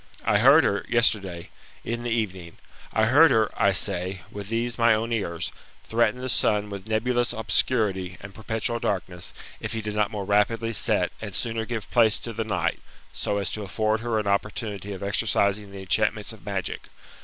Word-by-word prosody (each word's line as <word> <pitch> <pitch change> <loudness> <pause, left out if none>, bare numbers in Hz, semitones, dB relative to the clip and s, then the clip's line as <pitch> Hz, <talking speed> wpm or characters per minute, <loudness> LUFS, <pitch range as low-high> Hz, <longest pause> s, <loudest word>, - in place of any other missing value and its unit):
I 105 - +3
heard 140 +7 +7
her 100 -2 +1
yesterday, 100 -7 +1 0.3
in 120 +1 -3
the 120 - -3
evening, 95 -7 -3 0.3
I 110 - +3
heard 145 +8 +7
her, 110 -2 +3
I 100 - +3
say, 95 -1 0
with 100 -1 -7
these 115 +1 -2
my 115 -1 +5
own 115 +2 -2
ears, 85 -7 -2 0.3
threaten 115 0 +1
the 130 +1 -4
sun 105 -4 +1
with 100 0 -7
nebulous 120 +2 +1
obscurity, 100 -6 0
and 105 -1 -10
perpetual 110 +2 -2
darkness, 90 -4 -3 0.3
if - - -4
he 110 - -2
did 105 0 -4
not 105 -1 +1
more 100 -2 -4
rapidly 115 +3 +1
set, - - +2
and - - -5
sooner 115 -1 -1
give 110 -3 -5
place 115 -3 +4
to 115 - -6
the 115 - -2
night, 110 -2 -1 0.3
so 100 - -1
as 100 - -1
to 110 - -2
afford 110 +2 0
her 115 -1 -1
an 105 - -1
opportunity. 100 0 -2
of 95 -1 -6
exercising' 100 0 +1
the 100 0 -9
enchantments 105 +4 0
of 105 -5 -15
magic. 100 -2 -4
105 Hz, 185 wpm, -25 LUFS, 100-115 Hz, 0.3 s, heard